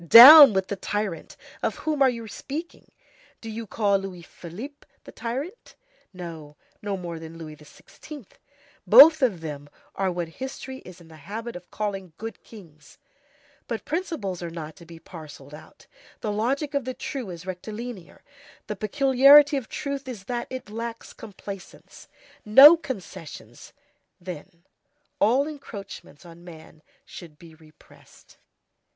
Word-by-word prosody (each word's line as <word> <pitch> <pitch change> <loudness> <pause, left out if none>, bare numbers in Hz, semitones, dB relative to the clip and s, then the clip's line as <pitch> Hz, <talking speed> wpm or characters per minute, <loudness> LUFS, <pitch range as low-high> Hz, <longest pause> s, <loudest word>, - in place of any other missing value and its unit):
Down 270 - +11
with 190 -1 0
the 200 - -2
tyrant! 205 -3 -4 0.2
Of - - -1
whom 305 -2 -3
are 270 - +6
you 230 -2 -6
speaking? 300 +10 -8 0.5
Do 225 - -8
you 225 0 -7
call 200 -1 +1
Louis 185 -3 -8
Philippe 215 - -11 0.2
the - - -12
tyrant? 275 - -6 0.4
No; 165 -5 -9 0.3
no 205 -2 -3
more 170 -2 -7
than 160 0 -10
Louis 155 -2 -9
XVI. 225 - -14 0.6
Both 315 +1 +9
of 210 -11 +1
them 145 -2 -7 0.2
are 195 -1 -1
what 175 -1 -4
history 265 0 -7
is 180 -5 -14
in 165 - -16
the 160 -1 -15
habit 225 +9 -7
of 175 0 -11
calling 195 -5 -5
good 225 +1 -8
kings; 160 -9 -16 0.7
but 230 -2 -5
principles 300 - -4
are 170 - -5
not 160 -2 -8
to 170 - -15
be 165 0 -12
parcelled 155 -4 -12
out, 150 - -15 0.4
the 215 - -2
logic 270 +8 -2
of 280 -1 0
the 255 +1 -5
true 255 -8 -6
is 175 -1 -9
rectilinear, 210 +2 -8 0.4
the 210 - -5
peculiarity 275 +6 +5
of 265 -5 -4
truth 280 -2 -5
is 230 -7 -7
that 240 +3 -4
it 260 -5 -8
lacks 230 +1 -7
complaisance; 200 -2 -11 0.4
no 270 +10 +9
concessions, 200 - -9 0.5
then; 175 0 -10 0.6
all 255 +8 +3
encroachments 200 - -10
on 170 0 -14
man 160 -2 -14 0.2
should 165 -4 -12
be 165 0 -15
repressed. 155 -1 -21
205 Hz, 145 wpm, -25 LUFS, 170-260 Hz, 0.7 s, Down